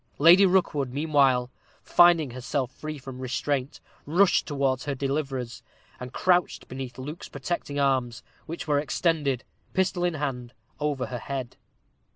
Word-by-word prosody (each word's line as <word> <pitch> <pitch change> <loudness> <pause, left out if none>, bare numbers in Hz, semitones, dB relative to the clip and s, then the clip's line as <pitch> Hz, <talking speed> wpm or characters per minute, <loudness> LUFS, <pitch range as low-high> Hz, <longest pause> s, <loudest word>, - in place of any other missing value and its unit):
Lady 175 +6 +7
Rookwood, 155 -8 +1
meanwhile, 135 -4 +2 0.3
finding 170 -6 +5
herself 130 +1 -3
free 155 +2 -7
from 130 -1 -9
restraint, 130 +1 -2 0.3
rushed 180 +5 +3
towards 135 -2 0
her 145 -2 -2
deliverers, 135 -3 -3 0.4
and 125 0 -7
crouched 180 +3 +1
beneath 130 -1 -7
Luke's 150 +6 -7
protecting 145 0 -4
arms, 130 -4 0 0.2
which 170 +1 -6
were 145 -1 +3
extended, 145 -3 0 0.3
pistol 185 -1 +1
in 175 -2 +1
hand, 125 -5 -4 0.3
over 145 -3 -1
her 125 - -5
head. 130 -2 -5
140 Hz, 135 wpm, -26 LUFS, 130-155 Hz, 0.4 s, Lady